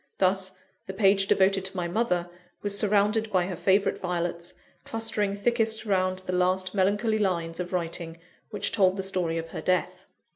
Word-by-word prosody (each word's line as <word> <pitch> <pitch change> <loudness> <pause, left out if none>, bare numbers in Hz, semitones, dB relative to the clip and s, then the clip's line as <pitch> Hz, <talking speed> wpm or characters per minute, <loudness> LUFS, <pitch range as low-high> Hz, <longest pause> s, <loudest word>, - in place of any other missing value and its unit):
Thus, 190 0 +1 0.3
the 190 - -6
page 195 -1 +4
devoted 195 0 +3
to 190 0 -3
my 175 -1 -1
mother 180 -3 0 0.4
was 205 -1 -1
surrounded 210 +1 +2
by 185 -3 +2
her 185 0 -4
favourite 190 +4 +2
violets, 175 -1 -3 0.3
clustering 215 -3 -1
thickest 225 +1 0
round 185 -2 0
the 185 - -3
last 185 +1 +1
melancholy 205 +3 +1
lines 170 -4 -1
of 180 0 -4
writing 170 -2 -3 0.3
which - - -1
told 190 -2 +3
the 195 - -2
story 180 -4 -1
of 165 0 -5
her - - -6
death. 180 -1 -1
190 Hz, 170 wpm, -27 LUFS, 180-205 Hz, 0.4 s, page